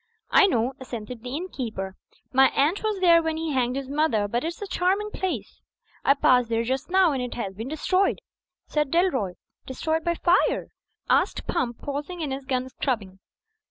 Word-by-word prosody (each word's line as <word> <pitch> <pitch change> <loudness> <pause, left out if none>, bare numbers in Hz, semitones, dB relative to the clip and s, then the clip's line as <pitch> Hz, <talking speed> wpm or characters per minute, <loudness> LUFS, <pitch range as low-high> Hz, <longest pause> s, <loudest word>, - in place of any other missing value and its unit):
"I 400 - +7
know," 245 - +1
assented 240 -2 -7
the 250 +3 -5
innkeeper. 230 - -4 0.4
"My 265 +1 +7
aunt 305 +8 +2
was 430 -2 -1
there 340 -2 +6
when 320 -1 -2
he 325 -1 -2
hanged 250 -2 +1
his 275 -1 -3
mother; 275 -8 +1
but 235 +4 -1
it's 335 +1 -4
a 410 - -4
charming 390 +3 0
place." 305 - -4 0.4
"I 275 - +5
passed 250 -4 +4
there 230 0 +1
just 260 +6 -2
now; 375 -2 +4
and 270 -3 -1
it 250 -1 -4
has 200 -5 -4
been 220 +5 -6
destroyed," 370 +6 +1 0.5
said 300 -2 0
Dalroy. 270 - +1 0.3
"Destroyed 315 +5 -1
by 340 0 0
fire?" 350 +2 +2 0.4
asked - - +2
Pump, 245 -9 -2
pausing 290 +5 -4
in 295 -3 -2
his 270 0 -4
gun 255 -1 -1
scrubbing. 210 -9 -3
275 Hz, 180 wpm, -25 LUFS, 245-340 Hz, 0.5 s, I